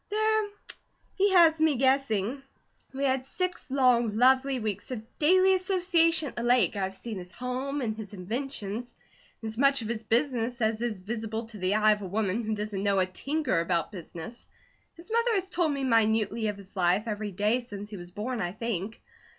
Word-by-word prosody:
"There 435 Hz, 0 st, +1 dB, 0.7 s
he 400 Hz, +1 st, +2 dB
has 330 Hz, -3 st, +6 dB
me 315 Hz, -2 st, +3 dB
guessing. 260 Hz, -2 st, +1 dB, 0.5 s
We 270 Hz, +1 st, -4 dB
had 265 Hz, -1 st, +1 dB
six, 360 Hz, +4 st, -4 dB
long, 245 Hz, -5 st, +3 dB
lovely 260 Hz, +2 st, +4 dB
weeks 210 Hz, -3 st, -4 dB
of 240 Hz, -4 st, -5 dB, 0.2 s
daily 370 Hz, +5 st, +5 dB
association 355 Hz, -4 st, +2 dB
at -, -, -15 dB
the -, -, -3 dB
lake, 240 Hz, -1 st, +3 dB
I've 195 Hz, -1 st, -2 dB
seen 215 Hz, 0 st, -6 dB
his 180 Hz, 0 st, -9 dB
home, 260 Hz, +5 st, -3 dB
and 220 Hz, -3 st, -2 dB
his 215 Hz, -3 st, -7 dB
inventions, 225 Hz, +2 st, -4 dB, 0.5 s
and -, -, -3 dB
as 220 Hz, +2 st, -6 dB
much 275 Hz, -2 st, +4 dB
of -, -, -5 dB
his 230 Hz, -2 st, -2 dB
business 240 Hz, 0 st, 0 dB
as 220 Hz, -1 st, 0 dB
is 235 Hz, -3 st, -1 dB
visible 220 Hz, +3 st, -4 dB
to 215 Hz, -3 st, -10 dB
the 185 Hz, +2 st, +1 dB
eye 215 Hz, 0 st, +5 dB
of 210 Hz, -1 st, 0 dB
a 195 Hz, -, -5 dB
woman 205 Hz, +3 st, -1 dB
who 215 Hz, 0 st, -1 dB
doesn't 210 Hz, -2 st, -3 dB
know 200 Hz, -1 st, +2 dB
a 185 Hz, -, +4 dB
tinker 275 Hz, -, -1 dB
about 170 Hz, +1 st, 0 dB
business. 175 Hz, +3 st, -9 dB, 0.5 s
His 345 Hz, +6 st, -12 dB
mother 465 Hz, +1 st, +2 dB
has 380 Hz, -1 st, -1 dB
told 340 Hz, -3 st, +1 dB
me 275 Hz, -1 st, -2 dB
minutely 220 Hz, -2 st, +2 dB
of 210 Hz, -1 st, -3 dB
his 200 Hz, 0 st, -14 dB
life, 185 Hz, +2 st, +2 dB
every 215 Hz, -1 st, -3 dB
day 210 Hz, +6 st, +1 dB
since 205 Hz, -4 st, -8 dB
he 205 Hz, -, -6 dB
was 175 Hz, -1 st, -9 dB
born, 220 Hz, +5 st, -4 dB
I 175 Hz, -1 st, -2 dB
think. 220 Hz, -1 st, -4 dB
230 Hz, 195 wpm, -28 LUFS, 205-275 Hz, 0.7 s, has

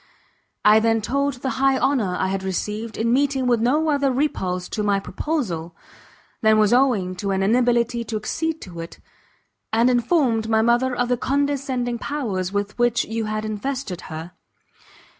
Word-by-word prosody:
I 210 Hz, +1 st, +7 dB
then 225 Hz, 0 st, +2 dB
told 280 Hz, +5 st, -1 dB
the 265 Hz, -, 0 dB
high 270 Hz, -1 st, +4 dB
honour 235 Hz, -10 st, +1 dB
I 190 Hz, -, 0 dB
had 195 Hz, 0 st, -2 dB
received, 210 Hz, +4 st, -4 dB
in 230 Hz, +1 st, +1 dB
meeting 270 Hz, -1 st, +1 dB
with 240 Hz, -2 st, +2 dB
no 300 Hz, +7 st, +2 dB
other 280 Hz, -2 st, +2 dB
repulse 185 Hz, -10 st, -1 dB
to 215 Hz, -, -3 dB
my 205 Hz, -1 st, +2 dB
proposal, 190 Hz, -, -3 dB, 0.7 s
than 220 Hz, 0 st, +4 dB
was 215 Hz, +1 st, +4 dB
owing 235 Hz, -8 st, +2 dB
to 200 Hz, +2 st, -3 dB
an 195 Hz, 0 st, 0 dB
inability 235 Hz, +2 st, +2 dB
to 225 Hz, -, -5 dB
accede 320 Hz, +9 st, -3 dB
to 175 Hz, -3 st, -9 dB
it; 165 Hz, 0 st, -8 dB, 0.7 s
and 230 Hz, +3 st, +3 dB
informed 240 Hz, -3 st, +1 dB
my 220 Hz, 0 st, +3 dB
mother 240 Hz, +2 st, +2 dB
of 245 Hz, 0 st, 0 dB
the 245 Hz, 0 st, +1 dB
condescending 265 Hz, -3 st, -1 dB
powers 205 Hz, -12 st, -3 dB
with 205 Hz, +2 st, -3 dB
which 240 Hz, -1 st, +2 dB
you 225 Hz, 0 st, -3 dB
had 215 Hz, 0 st, -3 dB
invested 215 Hz, -2 st, -4 dB
her. 160 Hz, +2 st, -7 dB
230 Hz, 165 wpm, -22 LUFS, 205-260 Hz, 0.7 s, I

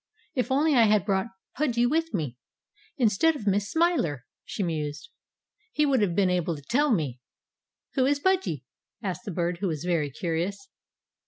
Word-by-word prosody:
"If 255 Hz, 0 st, -1 dB
only 295 Hz, +3 st, +3 dB
I 235 Hz, -4 st, +6 dB
had 210 Hz, -3 st, +3 dB
brought 195 Hz, 0 st, +1 dB, 0.3 s
Pudgy 245 Hz, -4 st, +1 dB
with 325 Hz, +6 st, +1 dB
me, 150 Hz, -, -2 dB, 0.6 s
instead 255 Hz, +6 st, +3 dB
of 265 Hz, -, -7 dB
Miss 200 Hz, 0 st, +1 dB
Smiler," 305 Hz, -, +1 dB, 0.2 s
she 205 Hz, -, -4 dB
mused, 150 Hz, -3 st, -3 dB, 0.6 s
"he 300 Hz, -, +3 dB
would 270 Hz, -5 st, +3 dB
have 185 Hz, -5 st, +1 dB
been 190 Hz, -2 st, +3 dB
able 175 Hz, -2 st, 0 dB
to 145 Hz, -, -11 dB
tell 280 Hz, -, +2 dB
me!" 145 Hz, -, 0 dB, 0.7 s
"Who 260 Hz, -2 st, +2 dB
is 285 Hz, 0 st, +2 dB
Pudgy?" 355 Hz, -, 0 dB, 0.4 s
asked 195 Hz, +4 st, -4 dB
the 205 Hz, -, -4 dB
Bird, 170 Hz, 0 st, -1 dB
who 200 Hz, -, -1 dB
was 155 Hz, -3 st, -3 dB
very 170 Hz, -5 st, 0 dB
curious. 180 Hz, -, -3 dB
200 Hz, 170 wpm, -27 LUFS, 170-265 Hz, 0.7 s, I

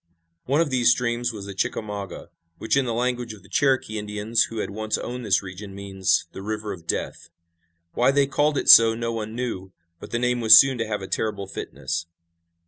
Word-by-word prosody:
One 140 Hz, +5 st, +2 dB
of 160 Hz, -4 st, -1 dB
these 125 Hz, -2 st, +3 dB
streams 120 Hz, 0 st, 0 dB
was 105 Hz, -3 st, -8 dB
the 100 Hz, -, -7 dB
Chickamauga, 100 Hz, 0 st, -5 dB, 0.3 s
which 110 Hz, -, -1 dB
in 135 Hz, -1 st, +2 dB
the 120 Hz, -, -2 dB
language 120 Hz, -1 st, -2 dB
of 100 Hz, -, -18 dB
the -, -, -19 dB
Cherokee 130 Hz, -6 st, +1 dB
Indians 105 Hz, +2 st, 0 dB
who 115 Hz, -, -9 dB
had 105 Hz, -, -3 dB
once 110 Hz, +1 st, -2 dB
owned 125 Hz, +1 st, -6 dB
this 100 Hz, -3 st, +1 dB
region 95 Hz, +1 st, -9 dB
means 95 Hz, -2 st, 0 dB
"the -, -, -9 dB
river 105 Hz, 0 st, -4 dB
of 85 Hz, -3 st, -13 dB
death." 85 Hz, -, -4 dB, 0.6 s
Why 125 Hz, -, +2 dB
they 140 Hz, +1 st, +3 dB
called 145 Hz, +1 st, 0 dB
it -, -, -2 dB
so 115 Hz, 0 st, +9 dB
no 115 Hz, 0 st, -3 dB
one 110 Hz, 0 st, -5 dB
knew, 95 Hz, -7 st, -5 dB, 0.3 s
but -, -, -10 dB
the 115 Hz, -, -2 dB
name 125 Hz, 0 st, 0 dB
was 110 Hz, -1 st, +9 dB
soon 135 Hz, -3 st, +5 dB
to 115 Hz, -, -2 dB
have 105 Hz, -2 st, -3 dB
a -, -, -6 dB
terrible 105 Hz, -2 st, -3 dB
fitness. 85 Hz, -3 st, -5 dB
110 Hz, 210 wpm, -24 LUFS, 100-125 Hz, 0.6 s, so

